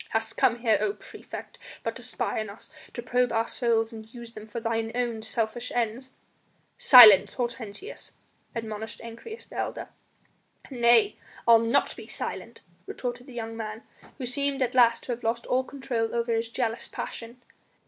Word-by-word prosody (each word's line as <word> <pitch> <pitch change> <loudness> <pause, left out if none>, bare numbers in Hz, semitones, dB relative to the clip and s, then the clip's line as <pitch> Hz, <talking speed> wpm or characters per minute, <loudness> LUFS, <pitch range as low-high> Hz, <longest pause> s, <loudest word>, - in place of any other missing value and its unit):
"Hast 225 0 -2
come 235 - +3
here, 220 -3 +3
O 400 - +1
praefect, - - -10 0.2
but - - -2
to - - -8
spy - - -2
on 215 -1 -4
us, 200 - -12 0.2
to 240 - -5
probe 250 0 +1
our 225 0 +1
souls 230 -1 0
and 220 0 -10
use 235 -1 -10
them 215 -1 -10
for 225 +2 -5
thine 225 0 -1
own 240 -3 -1
selfish 225 +2 -2
ends?" 245 +3 -2 0.6
"Silence, 245 - +9
Hortensius!" 240 - -5 0.4
admonished 220 -1 -5
Ancyrus, 235 - -9
the - - -11
elder. - - -3 0.8
"Nay, 240 - +4 0.3
I'll 230 -1 +8
not 230 +1 +1
be - - -10
silent!" - - -6 0.3
retorted 245 +1 -5
the 260 - -11
young 225 -1 -5
man, 220 0 -6 0.3
who 260 - -4
seemed 275 +2 -1
at 250 - -1
last 235 -2 +4
to - - -5
have 240 0 -4
lost 230 +1 -1
all 255 +1 +1
control 255 -4 -3
over 235 0 0
his 225 0 0
jealous 230 -1 -2
passion. 235 +2 -7
235 Hz, 170 wpm, -27 LUFS, 225-250 Hz, 0.8 s, Silence